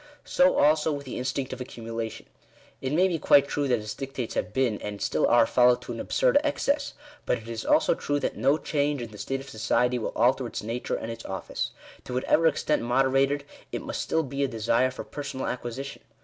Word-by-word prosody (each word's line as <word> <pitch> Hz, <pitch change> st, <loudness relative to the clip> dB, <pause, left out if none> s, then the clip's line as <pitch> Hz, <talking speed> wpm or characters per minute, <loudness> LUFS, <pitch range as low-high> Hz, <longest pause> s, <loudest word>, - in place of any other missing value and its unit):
So 275 Hz, +1 st, +4 dB
also 155 Hz, +1 st, +4 dB
with 140 Hz, -1 st, -4 dB
the 130 Hz, -, -5 dB
instinct 130 Hz, +1 st, -2 dB
of 130 Hz, -, -7 dB
accumulation. 115 Hz, -2 st, -6 dB, 0.6 s
It 130 Hz, -, -2 dB
may 180 Hz, +5 st, +4 dB
be 170 Hz, -3 st, -1 dB
quite 140 Hz, -1 st, +5 dB
true 145 Hz, -1 st, -1 dB
that 125 Hz, -2 st, +3 dB
its 105 Hz, -1 st, -5 dB
dictates 135 Hz, -4 st, -5 dB
have -, -, -2 dB
been, 120 Hz, -3 st, 0 dB
and 105 Hz, -1 st, -5 dB
still -, -, +1 dB
are, 120 Hz, -1 st, +5 dB
followed 125 Hz, 0 st, +4 dB
to -, -, -7 dB
an -, -, -5 dB
absurd -, -, +3 dB
excess; 290 Hz, -1 st, 0 dB, 0.3 s
but -, -, +2 dB
it 115 Hz, -, -12 dB
is 115 Hz, -1 st, -4 dB
also -, -, +4 dB
true 145 Hz, 0 st, -1 dB
that -, -, -2 dB
no 140 Hz, +3 st, +3 dB
change 145 Hz, -1 st, 0 dB
in 120 Hz, -2 st, -6 dB
the 105 Hz, -, -11 dB
state 135 Hz, +6 st, -3 dB
of 135 Hz, -, -12 dB
society 125 Hz, +2 st, +1 dB
will 110 Hz, -, -3 dB
alter 125 Hz, 0 st, +3 dB
its -, -, -5 dB
nature 115 Hz, +3 st, -2 dB
and 115 Hz, -, -4 dB
its 115 Hz, 0 st, -8 dB
office. 95 Hz, 0 st, -3 dB, 0.4 s
To 125 Hz, -, -5 dB
whatever 155 Hz, +5 st, +3 dB
extent 155 Hz, -1 st, +1 dB
moderated, 135 Hz, +3 st, +2 dB, 0.3 s
it -, -, -4 dB
must -, -, -3 dB
still 160 Hz, -, 0 dB
be 140 Hz, 0 st, -2 dB
a -, -, +2 dB
desire 115 Hz, +2 st, +1 dB
for 130 Hz, -, -7 dB
per 145 Hz, -, -7 dB
sonal 140 Hz, -2 st, -4 dB
acquisition. 125 Hz, +2 st, -5 dB
130 Hz, 220 wpm, -27 LUFS, 115-145 Hz, 0.6 s, quite